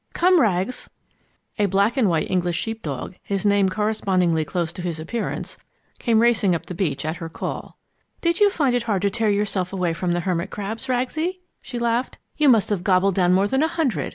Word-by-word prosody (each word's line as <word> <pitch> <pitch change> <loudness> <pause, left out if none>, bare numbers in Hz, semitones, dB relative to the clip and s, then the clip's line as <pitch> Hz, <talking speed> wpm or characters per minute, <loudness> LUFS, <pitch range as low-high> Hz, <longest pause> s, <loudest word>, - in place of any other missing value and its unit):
Come, 360 -1 +4
Rags!" 200 +1 0 0.7
A 205 - +3
black 200 +5 +2
and 240 -8 +3
white 165 -2 +1
English 175 -2 0
sheep 225 0 -4
dog, 150 +5 -5
his 200 0 -3
name 200 -1 +4
corresponding 195 -4 +1
closely 170 0 -2
to - - -4
his 170 -3 -3
appearance, 220 +9 -4 0.4
came 225 -2 +3
racing 205 -6 +3
up 165 - -5
the - - -6
beach 165 -6 -2
at 155 +2 -2
her 165 -2 -6
call. - - -6 0.4
"Did 340 0 +1
you 415 -1 +6
find 285 -10 +1
it 245 - +1
hard 195 -2 +1
to 200 - +2
tear 220 +1 +1
yourself 200 -3 0
away 180 -3 -1
from 175 +1 -1
the 175 - 0
hermit 175 -1 -1
crabs, 220 +6 -5
Ragsie?" 310 +9 -1 0.2
she 245 - -7
laughed. 235 +1 -1 0.2
"You 300 -2 +4
must 225 -4 +4
have 190 -4 -1
gobbled 190 0 +3
down 180 -1 +3
more 195 +2 +3
than 265 +6 +1
a 315 - +3
hundred. 265 - -1
200 Hz, 210 wpm, -23 LUFS, 180-235 Hz, 0.7 s, you